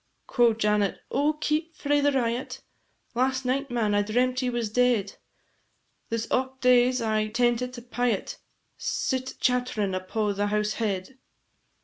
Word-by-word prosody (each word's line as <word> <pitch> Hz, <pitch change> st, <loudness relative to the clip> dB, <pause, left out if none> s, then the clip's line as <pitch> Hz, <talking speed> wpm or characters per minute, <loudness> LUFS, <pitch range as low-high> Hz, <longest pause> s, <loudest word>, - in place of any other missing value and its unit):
Quo' 240 Hz, -3 st, +3 dB
Janet, 210 Hz, -2 st, +1 dB
"Oh, 290 Hz, +3 st, +2 dB
keep 310 Hz, +2 st, -2 dB
frae 290 Hz, 0 st, +1 dB
the 285 Hz, 0 st, +3 dB
riot! 245 Hz, -1 st, -2 dB, 0.5 s
Last 260 Hz, +2 st, 0 dB
night, 275 Hz, +2 st, 0 dB
man, 230 Hz, -4 st, 0 dB
I 205 Hz, -, +3 dB
dreamt 250 Hz, +5 st, +1 dB
ye 255 Hz, -, 0 dB
was 235 Hz, -3 st, -2 dB
dead; 235 Hz, -4 st, +1 dB, 0.9 s
This 230 Hz, 0 st, -2 dB
aught 260 Hz, +1 st, 0 dB
days 250 Hz, -1 st, +4 dB
I 215 Hz, -1 st, +1 dB
tentit 240 Hz, +2 st, 0 dB
a 240 Hz, -, -9 dB
pyot 245 Hz, -4 st, -1 dB, 0.4 s
Sit 260 Hz, 0 st, -2 dB
chatt'rin' 245 Hz, -6 st, 0 dB
upo' 205 Hz, +3 st, -1 dB
the 205 Hz, +1 st, -1 dB
house 210 Hz, +1 st, 0 dB
head. 210 Hz, +4 st, -3 dB
245 Hz, 140 wpm, -26 LUFS, 215-255 Hz, 0.9 s, days